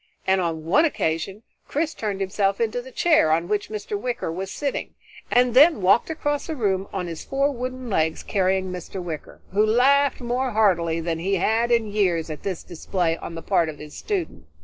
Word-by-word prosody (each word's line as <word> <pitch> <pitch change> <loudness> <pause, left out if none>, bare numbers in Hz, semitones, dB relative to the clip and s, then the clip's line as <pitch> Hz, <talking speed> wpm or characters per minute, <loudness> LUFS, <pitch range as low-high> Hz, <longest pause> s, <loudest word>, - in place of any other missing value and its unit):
and 190 0 +3
on 160 -2 -2
one 195 - +4
occasion 195 - -1 0.2
Chris 315 +2 -1
turned 205 -3 -3
himself 195 +1 0
into 230 +1 0
the 260 +1 -12
chair 305 - +3
on 165 +2 +1
which 210 +1 -1
Mr. 210 -1 -4
Wicker 235 -4 -3
was 190 +3 -4
sitting, 280 +4 -3 0.3
and 245 -1 +3
then 290 +1 +7
walked 195 - +3
across 290 -2 -2
the 320 - -3
room 195 -6 0
on 185 -2 -3
his 165 -2 -6
four 275 +1 0
wooden 255 0 -5
legs 160 -6 0
carrying 190 -1 0
Mr. 180 +1 -6
Wicker, 165 -4 -7
who 205 +2 +3
laughed 270 +6 +3
more 250 +1 -1
heartily 170 -6 +2
than 165 0 -2
he 195 +4 0
had 225 +6 +1
in 230 -2 +3
years 185 -6 0
at 150 - -7
this 190 -4 -4
display 175 0 -1
on 165 - -7
the 165 - -7
part 175 -5 +2
of 150 - -7
his 150 0 -10
student. 155 - -4
195 Hz, 195 wpm, -24 LUFS, 170-245 Hz, 0.3 s, then